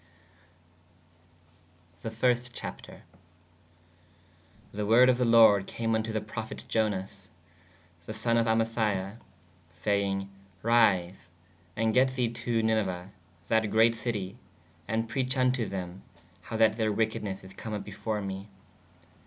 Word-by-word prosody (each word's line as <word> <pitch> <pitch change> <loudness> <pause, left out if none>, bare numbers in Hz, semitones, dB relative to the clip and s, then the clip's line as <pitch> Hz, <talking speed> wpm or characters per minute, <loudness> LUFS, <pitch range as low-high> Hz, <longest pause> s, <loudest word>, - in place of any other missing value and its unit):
The 115 - -4
first 120 +2 0
Chapter. - - -8 1.7
The 105 +1 -3
worde 120 +4 +6
of 125 -1 +3
the 125 - +3
lorde 110 -4 +6
came 115 -1 -2
vn 110 0 +1
to 110 - -4
the 110 - -1
prophete 110 +1 -7
Ionas 100 -3 -2 0.8
[the] 110 - -4
sonne 115 +1 +1
of 115 0 +2
Amithai 110 -3 0 0.5
sayenge: 95 +3 -1 0.4
ryse 100 -7 +2 0.3
& 90 +1 -32 0.2
gett 130 +1 +3
the 125 -3 +1
to 115 -1 -1
Niniue 100 -5 0 0.4
that 110 0 +2
greate 115 +2 +4
citie 110 -3 -4 0.3
& 100 +8 -3
preach 130 +3 -1
vn 130 -1 +3
to 120 -4 -2
thē/ 90 -1 -5 0.4
how 110 - -5
that 110 0 +4
theyr 110 -2 +1
wekednesse 105 -2 -2
is 95 0 -12
come 110 +3 -7
vpp - - -8
before 105 +1 -4
me. 95 +1 -6
110 Hz, 130 wpm, -29 LUFS, 100-115 Hz, 1.7 s, worde